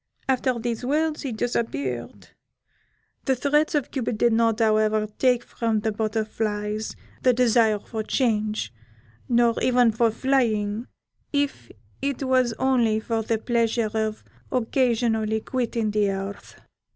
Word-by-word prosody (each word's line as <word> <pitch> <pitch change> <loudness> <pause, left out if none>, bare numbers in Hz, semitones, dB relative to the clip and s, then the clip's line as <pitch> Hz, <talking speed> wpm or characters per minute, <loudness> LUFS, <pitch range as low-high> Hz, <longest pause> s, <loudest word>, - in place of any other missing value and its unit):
After 255 -1 +1
these 235 0 -3
words 305 +4 0
he 270 - -3
disappeared. 135 - -3 1.0
The 265 - +2
threats 295 +4 +1
of 290 -4 -1
Cupid 240 -4 -2
did 235 +1 +3
not, 225 -1 +3
however, 215 -1 +3
take 250 -2 +3
from 225 -3 -1
the 220 - 0
Butterflies 215 0 -2 0.3
the 255 - +4
desire 230 -3 +3
for 220 +2 -5
change, 215 - 0 0.6
nor 235 -1 +4
even 245 -2 +4
for 230 +1 +2
flying, 225 -3 0 0.4
if 285 - -1 0.3
it 280 0 -2
was 255 -2 +2
only 240 -5 +2
for 225 0 -2
the 225 +1 0
pleasure 230 -1 0
of 220 -1 -2 0.3
occasionally 230 -3 +1
quitting 230 -2 -2
the 205 -1 +2
earth. 195 +1 -6
230 Hz, 125 wpm, -24 LUFS, 215-250 Hz, 1.0 s, the